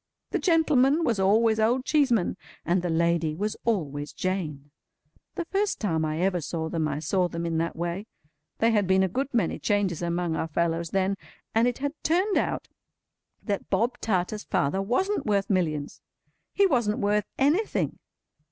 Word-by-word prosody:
The - - 0
gentleman 315 -3 +3
was 230 -9 +1
always 220 +3 +3
Old 245 +4 +2
Cheeseman, 260 - +2 0.3
and 175 +3 +2
the 175 - -2
lady 165 -1 +1
was 210 +5 -2
always 150 -10 -1
Jane. 155 -7 -3 0.6
The 345 - -3
first 395 +4 -1
time 165 -7 0
I 155 +2 -2
ever 180 -2 +1
saw 160 +1 -3
them, 160 -2 -1
I 145 -1 -2
saw 180 +4 +1
them 170 -1 -4
in 165 -1 0
that 165 +1 -2
way. 175 +5 -3 0.5
There 230 +1 +3
had 205 -4 +2
been 190 0 +4
a - - +2
good 265 +9 -2
many 230 -9 0
changes 200 -5 0
among 170 -1 -1
our 160 - -2
fellows 165 +1 -1
then, 195 +2 0 0.4
and 225 +2 +4
it 245 - -1
had 285 +1 -2
turned 370 +6 +1
out - - -2 0.8
that 200 -3 -3
Bob 240 +2 0
Tarter's 210 0 -1
father 165 +8 0
wasn't 375 - 0
worth 200 -1 +1
Millions! 155 -6 -1 0.5
He 400 - +3
wasn't 235 - +1
worth 205 0 +1
anything. 310 +11 +1
195 Hz, 170 wpm, -26 LUFS, 170-235 Hz, 0.8 s, been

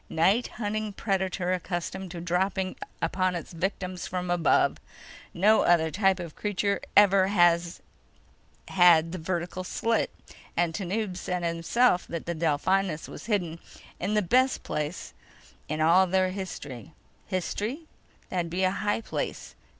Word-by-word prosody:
"Night 195 +9 +2
hunting 215 -1 -2
predator 190 -3 -1
accustomed 185 +1 -4
to 170 0 -7
dropping 185 +2 -1 0.3
upon 185 -1 +1
its 170 +1 -6
victims 185 +1 -3
from 180 -1 -3
above. 170 -4 +3 0.5
No 210 +5 +4
other 160 -2 +3
type 195 +1 +2
of 170 -3 -7
creature 205 -1 -1 0.2
ever 195 -2 +6
has 175 -3 +2 0.9
had 170 -3 +5
the 185 - -5
vertical 175 +2 -3
slit. 230 +5 0 0.5
And 170 -1 +2
Tanub 195 +1 -2
said 180 -1 -3
himself 175 +5 +2
that 170 -1 -5
the 170 - -2
Delphinus 165 +2 0
was - - -10
hidden 175 -7 -1 0.4
in 200 +4 -1
the 210 - +3
best 255 +8 +2
place 150 +3 -4 0.6
in 155 +1 -2
all 170 +4 +6
of - - -7
their 185 0 +2
history. 160 - -7 0.3
History? 210 - -2 0.5
That'd 175 -2 -2
be 180 +3 -1
a 185 - +3
high 205 +2 -1
place. - - -4
185 Hz, 140 wpm, -27 LUFS, 170-195 Hz, 0.9 s, ever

